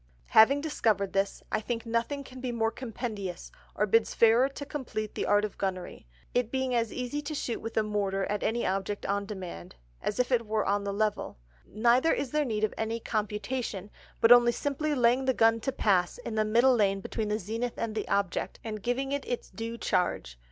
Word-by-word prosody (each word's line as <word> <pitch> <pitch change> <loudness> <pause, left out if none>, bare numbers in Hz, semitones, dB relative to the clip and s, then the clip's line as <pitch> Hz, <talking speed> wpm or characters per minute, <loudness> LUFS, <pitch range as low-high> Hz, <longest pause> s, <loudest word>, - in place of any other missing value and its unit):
Having 275 +6 +6
discovered 220 -10 0
this, 195 0 -1
I 215 - 0
think 230 +1 -3
nothing 235 +5 -1
can 255 -1 -11
be 255 -1 -2
more 225 -1 0
compendious, 220 -7 -5 0.2
or 210 - +2
bids 220 +2 +2
fairer 235 +4 +5
to 285 +1 -7
compleat 255 -7 -4
the - - -2
Art 205 +1 +4
of 210 - -8
Gunnery, 185 - -4 0.3
it 245 -2 +1
being 260 0 -1
as 230 -2 +1
easie 255 +4 -3
to 295 +1 -5
shoot 240 -4 -3
with 225 0 -6
a 220 - +4
Mortar 200 -2 -1
at 205 0 -2
any 235 +2 0
Object 195 +2 -2
on 200 0 -1
demand, 185 - -7 0.3
as 210 - -2
if 250 +1 +1
it 235 -3 +2
were 215 0 0
on 200 0 0
the 200 - -1
Level; 210 - -1 0.3
neither 240 +8 +3
is 265 - -1
there 300 -1 +1
need 215 -4 -2
of 215 - +1
any 225 +1 -1
Computation, 210 -1 -3 0.3
but 230 - +6
only 240 0 +8
simply 295 +3 -1
laying 250 +1 +3
the 260 -1 +2
Gun 225 0 +4
to 270 - -2
pass, 190 -8 +1
in 240 -2 -6
the 215 0 +2
middle 240 +4 +4
Line 195 -3 +2
between 215 +2 -3
the 210 0 0
Zenith 225 +4 -4
and 230 -2 -2
the 215 -1 -3
Object, 200 -2 -1
and 215 -2 -5
giving 260 +5 -1
it 285 0 -1
its 245 - -4
due 230 +1 -5
Charge. 175 - -1
225 Hz, 210 wpm, -29 LUFS, 205-245 Hz, 0.3 s, only